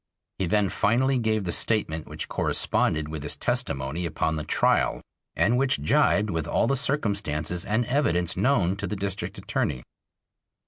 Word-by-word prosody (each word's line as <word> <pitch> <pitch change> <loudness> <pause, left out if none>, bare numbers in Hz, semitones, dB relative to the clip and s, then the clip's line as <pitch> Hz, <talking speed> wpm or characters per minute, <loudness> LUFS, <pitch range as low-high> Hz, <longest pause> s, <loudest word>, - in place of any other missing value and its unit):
He 95 - 0
then 105 0 +2
finally 130 +7 +1
gave 110 -2 0
the 90 - -2
statement 80 -9 +1
which - - -5
corresponded 75 -1 +1
with 80 -1 -6
his 75 - -2
testimony 70 +6 -2
upon 80 0 -1
the 75 - -3
trial - - +1 0.3
and 120 +4 +2
which 135 0 +2
jibed 120 -8 +2
with 80 -2 -2
all - - +1
the 135 - +1
circumstances 100 - 0
and 110 +4 0
evidence 90 - 0
known 100 -9 +2
to - - -4
the 105 - -3
District 100 0 -4
Attorney. 60 - -2
100 Hz, 155 wpm, -25 LUFS, 80-120 Hz, 0.3 s, then